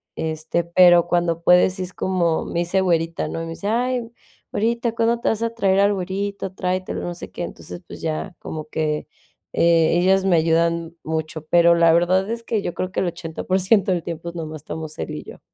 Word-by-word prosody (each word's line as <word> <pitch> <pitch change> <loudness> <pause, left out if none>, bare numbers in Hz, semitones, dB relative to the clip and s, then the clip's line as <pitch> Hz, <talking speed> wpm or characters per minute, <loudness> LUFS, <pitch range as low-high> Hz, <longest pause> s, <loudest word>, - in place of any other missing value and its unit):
Este, 160 +1 -2
pero 175 0 +6
cuando 170 -1 0
puede, 180 +1 +6
sí 185 0 -4
es 180 0 -7
como, 175 -4 0
me 170 - -3
dice 175 +3 +1
güerita, 165 -2 0
¿no? 165 - -4
Y - - -4
me 165 - -6
dice: 200 +5 -5
"Ay 245 0 0 0.4
güerita, 235 +2 0
¿cuándo 230 0 +1
te - - +1
vas 225 0 -1
a 230 - 0
traer 195 -3 +2
al 205 0 +4
güerito? 195 +1 -3
Tráetelo, 185 0 -2
no 175 - -4
sé, - - -9
qué". - - -5
Entonces, 175 - -8
pues - - -10
ya, 165 +4 -3
como 155 -1 -6
que, 155 -1 -2 0.5
eh, 165 -1 +4
ellas 190 +1 +3
me 185 -3 +4
ayudan 165 +1 +1
mucho, 160 0 -4
pero 170 0 +5
la 165 -1 +5
verdad 185 +4 +2
es 230 0 -4
que 220 -3 -1
yo 175 - -4
creo 185 0 -3
que - - -2
el - - 0
80% 165 -2 -6
por 190 +1 +2
ciento 190 -1 +3
del 175 - -2
tiempo, 170 0 -5
nomás 155 -2 -6
estamos 155 0 -7
él - - -4
y - - -6
yo. - - -12
175 Hz, 215 wpm, -22 LUFS, 165-195 Hz, 0.5 s, pero